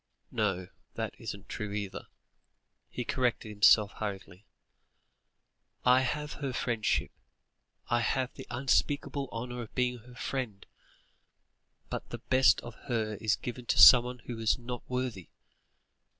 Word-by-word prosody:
No, 95 -4 -1 0.3
that - - -3
isn't 100 -1 -7
true 105 -2 -5
either," 100 -2 -5 0.8
he 125 - -5
corrected 120 -4 -1
himself 105 0 +5
hurriedly. 100 -1 -7 1.4
"I 125 +1 +6
have 150 +3 -2
her 135 -2 -2
friendship. 115 -3 0 0.8
I 120 - +2
have 130 +2 0
the 130 - -10
unspeakable 140 +2 0
honour 120 +1 -5
of 115 - -10
being 125 -1 0
her 125 +2 -15
friend, 125 -7 -4 1.3
but - - -5
the - - -5
best 130 -5 +4
of 120 - -9 0.2
her 110 -3 0
is 110 -3 +2
given 125 0 -7
to - - +1
someone 125 0 +8
who 120 -2 -6
is 110 -1 +2
not 125 0 -6
worthy. 125 -8 -3
120 Hz, 130 wpm, -30 LUFS, 105-125 Hz, 1.4 s, someone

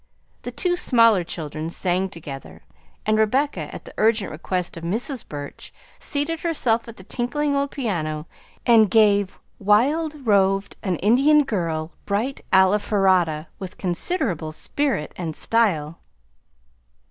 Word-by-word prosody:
The - - -5
two 355 -1 0
smaller 230 - +4
children 155 -1 -5
sang 185 +2 0
together, 135 - -9 0.4
and 215 0 +2
Rebecca, 265 +7 +1
at - - -9
the - - -11
urgent 220 -2 +2
request 180 +3 -3
of 165 - -8
Mrs. 230 - -2
Burch, 145 -1 -8 0.3
seated 300 +3 -1
herself 250 -10 0
at 230 - -10
the 190 - -12
tinkling 280 +7 -1
old 280 0 0
piano 160 - -3 0.4
and 225 -4 +6
gave 205 -3 +3 0.2
"Wild 280 +9 +2
roved 195 -2 +2
an 185 -3 -1
Indian 270 - +4
girl, 165 - -2 0.2
bright 220 +7 -1
Alfarata" 190 -4 +3
with 190 -2 -7
considerable 180 - -1
spirit 265 - -2
and 165 -3 -4
style. 170 -9 +1
205 Hz, 125 wpm, -23 LUFS, 170-250 Hz, 0.4 s, and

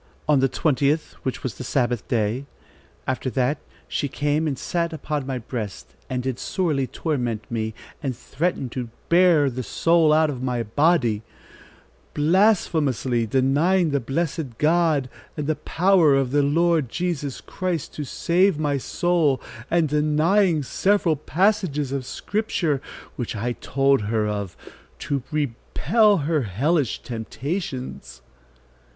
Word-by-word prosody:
On 150 -2 +4
the 135 0 +3
20th, 150 +1 +1
which 130 - -4
was 130 - -2
the - - -4
Sabbath 120 -6 0
day. 115 +4 -1 0.6
After 130 0 -2
that, 130 +3 0 0.3
she 145 - -1
came 145 +3 0
and 140 -3 -2
sat 170 +2 -2
upon 150 -2 -3
my 130 -1 -2
breast 110 - -6 0.2
and 125 -1 -2
did 130 -2 -3
sorely 155 -8 0
torment 120 -10 -2
me 110 -1 -2 0.3
and 135 -5 -3
threaten 160 -1 -2
to 120 -1 -5 0.2
bear 170 -4 +5
the 130 -1 -3
soul 165 +6 +3
out 155 0 +4
of 130 -3 -6
my 125 -2 -1
body, 120 -2 +2 0.9
blasphemously 150 - +2
denying 150 - +2
the 140 - +1
blessed 135 -1 -3
God, 155 -3 +2 0.3
and 150 - -2
the 155 - +1
power 165 0 +3
of 135 -2 +1
the 145 +1 +3
Lord 160 -1 +2
Jesus 155 -4 -3
Christ 180 -5 -3
to 150 - -4
save 175 +6 +2
my 145 -2 0
soul, 160 -3 +1 0.3
and 170 -2 +3
denying 155 +4 +2
several 190 +3 +2
passages 160 -3 0
of 135 -2 -3
Scripture, 180 -9 -1 0.4
which 120 -2 -3
I 115 +4 -1
told 135 +1 +1
her 110 0 0
of, 100 -3 -4 0.4
to 140 -2 -2
repel 155 - +2
her 155 -1 +1
hellish 130 - 0
temptations." 130 - -5
145 Hz, 135 wpm, -23 LUFS, 125-165 Hz, 0.9 s, bear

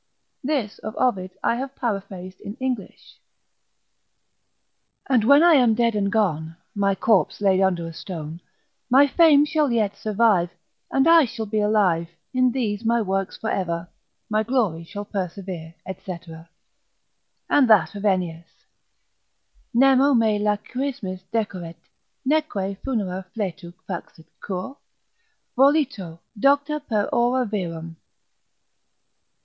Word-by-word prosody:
(This 260 -7 -2
of 215 +2 -7
Ovid 195 -8 +1
I 235 - +1
have 270 +1 -5
paraphrased 195 -5 -5
in 205 +1 -7
English.) 255 -6 -5 1.9
And 250 -5 +3
when 280 +7 +6
I 345 -1 +7
am 245 -6 +5
dead 235 0 +2
and 200 -1 0
gone, 165 -7 0 0.2
My 200 -1 +1
corpse 205 0 +2
laid 195 -2 +3
under 180 -3 +1
a 165 - -8
stone 165 -1 -7 0.5
My 270 +3 +7
fame 295 0 +5
shall 300 -3 +1
yet 215 -4 +1
survive, 210 -5 +2 0.4
And 270 +3 +2
I 330 -2 +7
shall 225 -1 -5
be 215 +1 -1
alive, 200 -6 +2 0.2
In 255 -1 +3
these 225 -4 -2
my 235 +1 +2
works 195 -2 -2
for 220 - -3
ever, 170 -2 -2 0.4
My 215 0 +1
glory 220 -9 0
shall 205 +4 -7
persever, 180 -4 -5
&c. 185 -1 -6 1.3
And 270 -5 +4
that 210 -7 +5
of 200 0 -7
Ennius, 175 -5 -1 1.2
Nemo 265 +2 +5
me 220 -3 +2
lachrymis 210 -1 -3
decoret, 185 -7 -3 0.5
neque 210 -10 -1
funera 195 -8 -2
fletu 185 -5 -4 0.2
Faxit, 170 -3 -7
cur? 190 +7 -5 0.8
volito 265 - +2 0.2
docta 285 +4 +2
per 225 -8 -1
ora 245 +1 +2
virum. 165 -6 -5
210 Hz, 120 wpm, -23 LUFS, 185-255 Hz, 1.9 s, I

